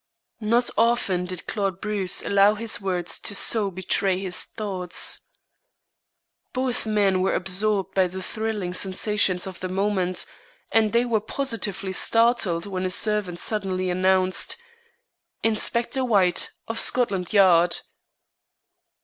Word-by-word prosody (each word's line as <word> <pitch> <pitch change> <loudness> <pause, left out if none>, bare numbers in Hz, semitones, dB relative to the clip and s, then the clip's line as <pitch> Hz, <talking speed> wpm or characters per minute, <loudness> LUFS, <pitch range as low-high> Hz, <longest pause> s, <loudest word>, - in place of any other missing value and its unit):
Not 235 +2 +1
often 225 -6 +1
did 180 -1 -6
Claude 195 -4 -2
Bruce 205 -4 0
allow 200 +1 +4
his 225 0 -2
words 180 -3 -1
to 205 - -2
so 210 0 +3
betray 190 0 0
his 185 -2 0
thoughts. 190 -5 -2 1.3
Both 255 -3 -2
men 200 -3 +2
were 190 - +1
absorbed 195 +1 0
by 190 -1 +3
the 185 +1 -7
thrilling 215 -5 -4
sensations 190 0 +1
of 190 -2 -8
the 185 - -4
moment, 185 -2 -1 0.5
and 220 -2 +3
they 235 +1 +2
were 225 -3 0
positively 215 -6 -3
startled 225 -6 +2
when 190 -2 -4
a 185 - -1
servant 200 -2 -1
suddenly 185 -2 -2
announced: 185 - +1 0.9
"Inspector 235 +3 0
White, 195 -7 +2 0.2
of 225 0 -2
Scotland 195 -8 +1
Yard." 180 -4 +4
195 Hz, 125 wpm, -24 LUFS, 185-220 Hz, 1.3 s, allow